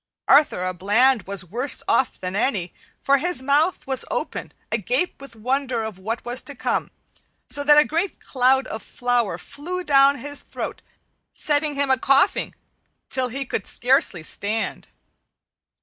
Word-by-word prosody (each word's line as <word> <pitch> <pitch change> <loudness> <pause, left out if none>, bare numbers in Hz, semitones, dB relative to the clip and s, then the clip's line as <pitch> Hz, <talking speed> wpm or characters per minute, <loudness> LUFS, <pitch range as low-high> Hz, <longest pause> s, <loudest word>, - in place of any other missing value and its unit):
Arthur 285 -11 +4
a 185 - -2
Bland 210 +6 +2
was 195 -1 -1
worse 245 - -1
off 265 - +1
than 185 +1 -4
any, 200 -6 -1 0.3
for 280 0 +4
his 345 -3 -2
mouth 295 +6 +2
was 265 -1 -2
open, - - -4 0.2
agape 360 - -1
with 275 -4 -11
wonder 255 +1 -1
of 215 -4 -6
what 225 +5 -4
was 245 +2 0
to 285 - -3
come, - - -1 0.6
so 285 - +3
that 295 +1 +6
a 300 - +7
great 340 +5 -2
cloud 265 0 +2
of 220 - -6
flour 245 -3 -1
flew 360 +6 -6
down 280 -2 +5
his 285 +3 -3
throat, - - -6 0.5
setting 295 0 0
him 280 -1 +1
a 260 - +3
coughing 275 +8 +2 0.5
till 260 -1 0
he 270 +3 -4
could 210 - -3
scarcely 245 - +1
stand. 210 +7 -3
265 Hz, 155 wpm, -23 LUFS, 225-285 Hz, 0.6 s, a